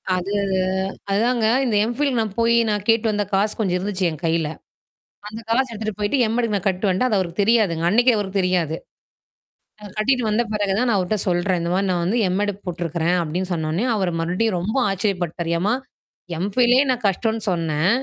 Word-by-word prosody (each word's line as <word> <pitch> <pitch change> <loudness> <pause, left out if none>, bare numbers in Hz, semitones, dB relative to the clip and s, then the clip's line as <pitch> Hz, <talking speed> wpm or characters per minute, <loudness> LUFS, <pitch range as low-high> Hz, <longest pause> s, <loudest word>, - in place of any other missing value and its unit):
அது 185 +3 -3 0.8
அதாங்க. 230 +2 +1 0.2
இந்த 225 -4 0
M.Phil 280 +4 0
நான் 215 -3 -2
போய் 230 0 +3
நான் 210 -1 -1
கேட்டு 225 0 +3
வந்த 205 0 0
காசு 205 +2 +2
கொஞ்சம் 185 -4 +1
இருந்துச்சு 190 0 -2
என் 155 +1 -8
கையில. 165 -1 +1 0.8
அந்த 220 +2 -7
காசு 260 +3 +2
எடுத்துட்டு 215 -1 -4
போயிட்டு 210 +7 0
M.Ed. 240 +1 0
க்கு 210 - -3
நான் 200 0 -1
கட்டு 190 +2 0
வந்டேன், 190 +8 +1
அது 210 - +2
அவருக்கு 175 +2 -2
தெரியாதுங்க. 200 -7 +2
அன்னக்கே 240 +4 +4
அவருக்கு 195 -1 -2
தெரியாது. 175 -4 0 1.1
அத 205 - -9
கட்டிட்டு 250 +3 +2
வந்த 215 +3 +2
பிறகு 205 -2 0
தான் 250 - +1
நான் 215 - +2
அவர்ட்ட 185 +4 0
சொல்றேன். 175 +1 +1
இந்தமாரி 180 +4 0
நான் 175 -1 0
வந்து 220 +7 0
M.Ed. 205 +2 0
போட்டுருக்கிறேன். 170 0 -1
அப்பிடின்னு 180 +4 -3
சொன்னவுனே 160 +7 -1
அவரு 185 -4 0
மறுபடியும் 185 +4 0
ரொம்ப 210 +8 -2
ஆச்சரியப்பட்டாரு. 180 -4 -2
"ஏம்மா! 210 +6 +1 0.7
M.Philலே 245 +5 +3
நான் 245 -3 -2
கஷ்டோன்னு 220 +3 0
சொன்னேன். 165 -1 0
200 Hz, 175 wpm, -21 LUFS, 180-220 Hz, 1.1 s, அன்னக்கே